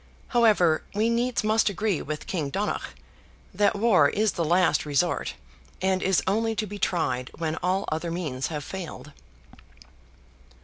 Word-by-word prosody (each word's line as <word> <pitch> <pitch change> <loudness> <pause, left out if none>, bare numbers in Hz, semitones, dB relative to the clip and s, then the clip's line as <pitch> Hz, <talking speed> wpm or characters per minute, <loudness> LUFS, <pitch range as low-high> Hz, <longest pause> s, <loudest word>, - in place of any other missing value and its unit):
However, 210 -10 +4
we 220 +3 +2
needs 240 0 0
must 215 0 +3
agree 205 -3 -1
with 150 +1 -5
King 155 -7 -2
Donogh, 200 +8 -3 0.6
that 205 -1 +2
war 200 -9 +4
is 215 0 +1
the 170 - -2
last 175 +2 +3
resort, 145 -3 0 0.4
and 190 0 +1
is 190 -2 +2
only 225 +3 0
to 215 - -1
be 205 0 -8
tried 130 -10 -1
when 160 -2 -2
all 185 +2 0
other 160 +2 -2
means 155 -7 -3
have 150 -3 -5
failed. 170 -3 -7
185 Hz, 145 wpm, -26 LUFS, 155-210 Hz, 0.6 s, However